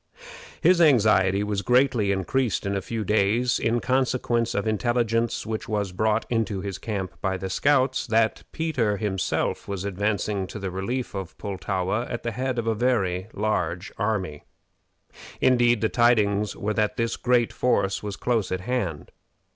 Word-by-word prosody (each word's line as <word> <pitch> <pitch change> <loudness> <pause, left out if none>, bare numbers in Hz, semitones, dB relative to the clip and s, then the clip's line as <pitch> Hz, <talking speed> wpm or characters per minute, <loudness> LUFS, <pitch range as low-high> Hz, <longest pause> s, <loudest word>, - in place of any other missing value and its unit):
His 180 -1 +5
anxiety 105 - +4
was 105 -1 -1
greatly 125 -4 +3
increased 100 +6 0
in 100 0 -1
a 100 - -1
few 110 +3 -4
days 110 +5 +2
in 115 +1 +1
consequence 125 -2 0
of 100 +2 -1
intelligence 115 +1 0
which 110 -1 -4
was 105 -3 -1
brought 110 +4 +1
into 110 -4 -1
his 95 -1 -5
camp 95 -6 -5
by 95 -1 -1
the 95 0 -5
scouts, 130 +3 +2
that 110 -1 +2
Peter 130 -11 0
himself 100 -3 -1
was 100 -1 -4
advancing 100 0 -1
to - - -8
the 95 -2 -4
relief 120 +7 -3
of 95 -3 -6
Pultowa 100 +2 -2
at 120 - -4
the 115 - -2
head 130 +2 -2
of 115 - -1
a 115 - +1
very 100 -6 0
large 90 -4 -2
army. 95 -9 -2 1.0
Indeed, 120 -3 +3
the 110 - +3
tidings 105 -4 +2
were 105 +1 -2
that 105 0 0
this 115 -1 0
great 120 -2 +1
force 100 -6 +1
was 105 -2 -5
close 115 -5 -1
at 95 0 -2
hand. 100 -9 -3
110 Hz, 160 wpm, -25 LUFS, 100-120 Hz, 1.0 s, His